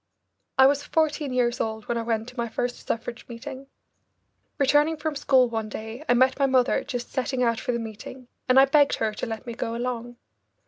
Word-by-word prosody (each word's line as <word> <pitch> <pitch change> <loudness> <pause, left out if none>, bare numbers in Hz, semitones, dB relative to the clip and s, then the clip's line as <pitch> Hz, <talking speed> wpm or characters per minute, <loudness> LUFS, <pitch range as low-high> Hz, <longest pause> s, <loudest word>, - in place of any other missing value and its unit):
I 265 - +8
was 285 +1 +4
fourteen 310 -3 0
years 245 -1 +1
old 220 -1 -3
when 240 - -1
I 230 - -1
went 225 -1 -2
to 250 - -15
my 235 -2 -2
first 245 +2 -4
suffrage 235 +1 -3
meeting. 265 +3 -8 0.9
Returning 295 +3 +3
from 305 0 -3
school 265 -3 +4
one 225 -2 -3
day, 220 +6 -7
I 245 - +5
met 260 +2 +3
my 275 - +4
mother 260 -1 +2
just 245 -1 -5
setting 260 -1 -1
out 230 -2 +1
for 245 - -2
the 235 - -1
meeting, 230 +3 -8 0.2
and 255 +1 +7
I 270 - +8
begged 285 +1 +4
her 220 -1 -1
to - - -4
let 225 +2 -5
me 235 - -5
go 230 0 -3
along. 240 0 -4
245 Hz, 210 wpm, -25 LUFS, 230-270 Hz, 0.9 s, I